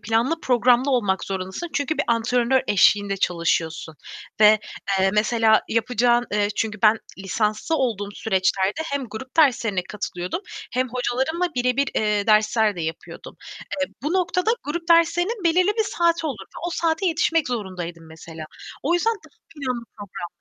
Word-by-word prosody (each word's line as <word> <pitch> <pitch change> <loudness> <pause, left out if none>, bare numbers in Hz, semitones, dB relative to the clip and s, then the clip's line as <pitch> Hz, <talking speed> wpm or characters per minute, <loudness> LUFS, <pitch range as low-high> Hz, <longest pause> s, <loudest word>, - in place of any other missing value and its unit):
planlı 235 +9 0
programlı 250 +1 +3
olmak 205 -8 +1
zorundasın 190 - -5
çünkü 285 +2 -1
bir - - +1
antrenör 240 +2 +2
eşliğinde 205 0 +3
çalışıyorsun 165 -3 -1 0.5
ve, 215 0 +7 0.4
eee, 190 0 +3
mesela 220 0 +3
yapacağın 240 +1 +2
Eee, 205 0 +1
çünkü 215 -2 -2
ben 220 0 +5 0.2
lisanslı 210 - -1
olduğum 225 -8 -1
süreçlerde 190 +4 0
hem 280 -4 -3
grup 255 +7 -9
derslerine 235 - +3
katılıyordum 180 - -5 0.3
hem 255 +1 0
hocalarımla 260 +8 -1
birebir, 250 +2 +1
eee, 210 -1 0
dersler 215 -1 +3
de - - -4
yapıyordum. 160 0 -7 0.5
Eee, 280 - -2
bu 300 +4 -1
noktada 365 +2 +1
grup 330 +4 -4
derslerinin 345 +5 +3
belirli 360 +3 +3
bir 440 - +3
saati 335 -4 +1
olurdu. 220 -10 -7
O 350 - -3
saate 330 +3 0
yetişmek 325 -2 +1
zorundaydım 180 -7 -5
mesela. 160 0 -10 0.4
O 330 +5 +1
yüzden 450 +6 +2
daha 415 - -18 0.2
planlı, 255 -5 -4
programlıydım. 200 -3 -7
235 Hz, 145 wpm, -23 LUFS, 205-305 Hz, 0.5 s, ve